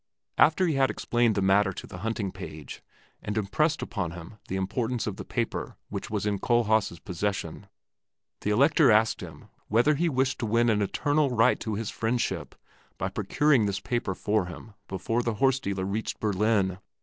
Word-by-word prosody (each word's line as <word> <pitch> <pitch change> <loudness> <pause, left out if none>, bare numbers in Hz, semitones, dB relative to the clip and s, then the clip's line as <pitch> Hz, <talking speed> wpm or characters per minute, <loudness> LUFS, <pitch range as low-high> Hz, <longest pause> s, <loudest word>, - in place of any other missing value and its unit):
After 160 +5 +5
he 165 - +1
had 135 -1 +3
explained 120 -2 +1
the 100 - +1
matter 95 +1 +4
to - - -8
the 90 - -9
hunting 105 -1 -2
page 80 -7 -9 0.4
and 105 +1 -4
impressed 150 +10 +1
upon 90 -6 -3
him 90 +5 -10
the 95 - -3
importance 115 +5 -1
of 105 -3 -4
the - - -6
paper - - -3
which - - -5
was 105 -1 -2
in 100 -2 0
Kohlhaas' 110 -6 +2
possession, 100 +4 -4 0.7
the - - -2
Elector 140 +6 +4
asked 110 0 +3
him - - -10 0.2
whether 120 +8 +3
he 165 +4 +1
wished 130 -1 0
to 115 - -2
win 115 +2 +3
an 105 -1 +1
eternal 145 +8 +1
right 125 0 +3
to 110 -2 -3
his 110 0 -3
friendship 115 +2 -2 0.4
by 95 - -2
procuring 110 +5 +2
this 100 -1 -2
paper 110 -3 -2
for 105 -2 0
him 95 +5 -10
before 115 +5 -1
the 115 -2 -2
horse 135 +3 +3
dealer 100 -5 -3
reached 105 +3 -3
Berlin. 100 -2 +1
110 Hz, 180 wpm, -27 LUFS, 95-120 Hz, 0.7 s, After